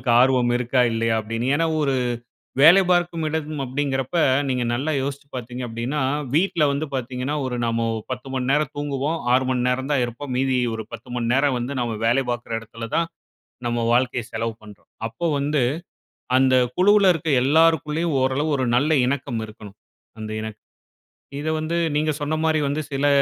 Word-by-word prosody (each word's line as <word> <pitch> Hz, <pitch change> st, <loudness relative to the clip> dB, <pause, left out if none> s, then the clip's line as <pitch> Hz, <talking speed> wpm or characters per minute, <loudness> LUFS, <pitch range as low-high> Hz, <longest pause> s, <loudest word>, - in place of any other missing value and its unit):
அவுங்களுக்கு 125 Hz, -, -1 dB
ஆர்வம் 125 Hz, -2 st, +3 dB
இருக்கா? 125 Hz, +1 st, +1 dB
இல்லையா? 115 Hz, 0 st, +1 dB
அப்டீன்னு. 115 Hz, +4 st, -2 dB
ஏன்னா 165 Hz, +2 st, +1 dB
ஒரு 140 Hz, -3 st, +1 dB, 0.7 s
வேலை 175 Hz, +6 st, +8 dB
பார்க்கும் 175 Hz, -2 st, +1 dB
இடம் 155 Hz, -1 st, -3 dB
அப்டீன்கிறப்ப 135 Hz, +3 st, -2 dB, 0.3 s
நீங்க 125 Hz, -1 st, 0 dB
நல்லா 145 Hz, +6 st, -1 dB
யோசிச்சு 140 Hz, +1 st, -5 dB
பாத்தீங்க 125 Hz, +1 st, -6 dB
அப்டீன்னா, 120 Hz, +6 st, -3 dB, 0.3 s
வீட்ல 175 Hz, -1 st, +2 dB
வந்து 145 Hz, +3 st, -1 dB
பாத்தீங்கன்னா 130 Hz, +3 st, -3 dB
ஒரு 125 Hz, -, -3 dB
நாம 115 Hz, 0 st, 0 dB, 0.2 s
10 130 Hz, +1 st, -5 dB
மணி 125 Hz, -1 st, -1 dB
நேரம் 150 Hz, 0 st, +1 dB
தூங்குவோம். 145 Hz, +2 st, -2 dB
6 130 Hz, +1 st, +4 dB
மணி 125 Hz, -1 st, 0 dB
நேரம் 130 Hz, +2 st, -1 dB
தான் 140 Hz, -4 st, +2 dB
இருப்போம். 120 Hz, +3 st, -6 dB
மீதி 130 Hz, 0 st, +1 dB, 0.2 s
ஒரு 110 Hz, -, -4 dB
10 115 Hz, +2 st, -9 dB
மணி 120 Hz, -1 st, -1 dB
நேரம் 135 Hz, 0 st, +2 dB
வந்து 125 Hz, +3 st, -3 dB
நாம 115 Hz, -2 st, -2 dB
வேல 120 Hz, +4 st, +3 dB
பாக்குற 120 Hz, -1 st, -4 dB
எடத்துல 115 Hz, +1 st, -8 dB
தான் 165 Hz, 0 st, +1 dB, 0.6 s
நம்ம 120 Hz, 0 st, 0 dB
வாழ்க்கைய 125 Hz, -1 st, +1 dB
செலவு 115 Hz, 0 st, -2 dB
பண்றோம். 105 Hz, -2 st, -15 dB, 0.2 s
அப்போ 115 Hz, +9 st, -5 dB
வந்து 145 Hz, +1 st, 0 dB, 0.8 s
அந்த 130 Hz, 0 st, +4 dB, 0.2 s
குழுவுல 200 Hz, +1 st, +5 dB
இருக்குற 160 Hz, -2 st, -2 dB
எல்லாருக்குள்ளயும் 160 Hz, +2 st, +2 dB
ஓரளவு 135 Hz, +4 st, +1 dB
ஒரு 130 Hz, -, 0 dB
நல்ல 145 Hz, +5 st, +2 dB, 0.2 s
இணக்கம் 130 Hz, -3 st, -2 dB
இருக்கணும். 105 Hz, -2 st, -12 dB, 0.4 s
அந்த 110 Hz, -, -5 dB
இணக்க 110 Hz, 0 st, -6 dB, 0.8 s
இத 155 Hz, -, -3 dB
வந்து 160 Hz, +2 st, -2 dB, 0.2 s
நீங்க 155 Hz, 0 st, +1 dB
சொன்ன 150 Hz, +2 st, -1 dB
மாரி 155 Hz, -1 st, +2 dB
வந்து 150 Hz, +2 st, -1 dB
சில 140 Hz, +1 st, +1 dB
130 Hz, 170 wpm, -23 LUFS, 120-150 Hz, 0.8 s, வேலை